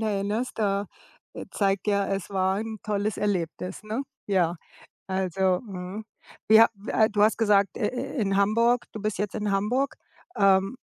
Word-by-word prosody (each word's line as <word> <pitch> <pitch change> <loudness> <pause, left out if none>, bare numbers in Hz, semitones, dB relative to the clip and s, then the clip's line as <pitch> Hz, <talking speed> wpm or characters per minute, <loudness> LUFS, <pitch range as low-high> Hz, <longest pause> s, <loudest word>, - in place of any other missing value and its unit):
erinnerst, 215 +3 -2
da 200 -1 0 0.5
äh, - - -7
zeigt 195 -1 0
ja, 200 -1 +1
es 195 -2 -3
war 190 -1 0
'n 220 0 -5
tolles 210 0 -1
Erlebnis, 185 0 -3
ne? 220 +6 -3 0.2
Ja, 180 -4 +1 0.5
also 190 -1 0
mhm, 195 0 -7 0.4
wie 220 +1 +8
ha 230 - +8
w 200 +2 -10
äh, 220 -1 +3
du 205 -1 0
hast 215 0 +4
gesagt, 205 -3 +3
äh, 210 - 0
äh, 260 +3 -5
in 195 -1 +1
Hamburg 230 +4 +3
du 215 - -6
bist 215 -3 -2
jetzt 205 -1 -3
in 210 -1 -1
Hamburg. 245 +8 0 0.4
Ähm, 195 +4 +3
205 Hz, 170 wpm, -26 LUFS, 195-220 Hz, 0.5 s, wie